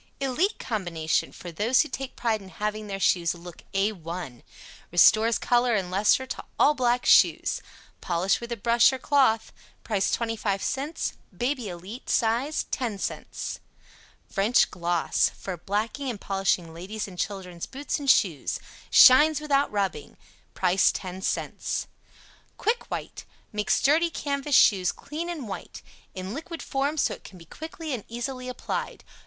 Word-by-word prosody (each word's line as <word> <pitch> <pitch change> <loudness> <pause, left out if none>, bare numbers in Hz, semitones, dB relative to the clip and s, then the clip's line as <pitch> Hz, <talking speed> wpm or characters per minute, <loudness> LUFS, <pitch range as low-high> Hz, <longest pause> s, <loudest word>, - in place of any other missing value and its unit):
"ELITE" 275 - 0
Combination 175 -8 -1
for 175 - -9
those 220 +10 +3
who - - -1
take 270 -3 -6
pride 225 -3 0
in 190 - -12
having 210 +1 -3
their 195 -1 -4
shoes 175 -3 +2
look 170 0 -11
A 195 +2 +2
1. 170 - -7 0.5
Restores 215 +6 +5
color 245 -1 +2
and 185 -3 -2
lustre 210 +7 +3
to - - -6
all 300 - +5
black 245 -2 +1
shoes. - - +4 0.4
Polish 180 +4 +1
with 235 0 -7
a 235 - -2
brush 235 +4 +4
or 265 - -3
cloth. 260 -5 +2 0.3
Price 205 -4 0
25c 225 +6 -2 0.2
"BABY 245 -3 -1
ELITE" 185 +7 -9
size, 240 +6 +1
10c. 225 -7 -4 0.7
"FRENCH 210 +4 +3
GLOSS." 175 -1 +1
For 190 - -5
blacking 215 - -2
and 225 -5 -4
polishing 195 -4 0
ladies' 200 +6 -5
and 180 -2 -11
children's 180 -4 -4
boots 285 +3 -3
and 280 -1 -2
shoes; 180 - +2 0.3
SHINES 295 +4 +8
WITHOUT 285 -2 +1
RUBBING. 195 -7 -1
(See - - -25
cut.) - - -29
Price 185 +1 +3
10c. 185 0 -3 0.7
"QUICK 460 +3 -1
WHITE" - - -6 0.3
makes 210 0 +1
dirty 320 +5 +3
CANVAS 285 -3 -1
shoes 190 -7 +5
clean 325 +4 -6
and 310 -9 -5
white. 195 - -7 0.3
In 185 +2 -5
liquid 325 +3 -6
form 280 +3 -1
so - - +2
it - - -12
can 190 - -12
be 165 - -14
quickly 320 - -7
and 230 -5 -4
easily 250 +2 -5
applied. 250 - -4
220 Hz, 150 wpm, -26 LUFS, 190-270 Hz, 0.7 s, SHINES